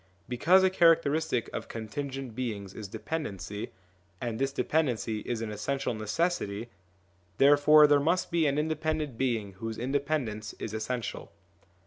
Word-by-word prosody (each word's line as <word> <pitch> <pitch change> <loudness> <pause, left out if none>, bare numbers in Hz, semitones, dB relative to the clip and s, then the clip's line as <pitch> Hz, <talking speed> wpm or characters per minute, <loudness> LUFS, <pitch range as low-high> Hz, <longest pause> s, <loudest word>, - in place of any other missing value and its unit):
Because 165 +10 +4
a 190 - +4
characteristic 160 -7 +3
of - - -4
contingent 135 +3 -5
beings 105 -6 -4
is 105 - -7
dependency, 105 - -5 0.5
and 115 -2 -3
this 135 0 +1
dependency 125 -8 0
is 115 -2 -2
an 110 - -4
essential 130 +5 -2
necessity, 110 - -1 0.7
therefore 145 +2 +7
there 145 -1 +5
must 165 +6 +1
be 165 -2 +3
an 140 0 0
independent 155 -2 -1
being 115 -5 -1
whose 115 +1 -5
independence 130 -5 -2
is 110 - -5
essential. 110 +1 -4
135 Hz, 130 wpm, -29 LUFS, 110-155 Hz, 0.7 s, therefore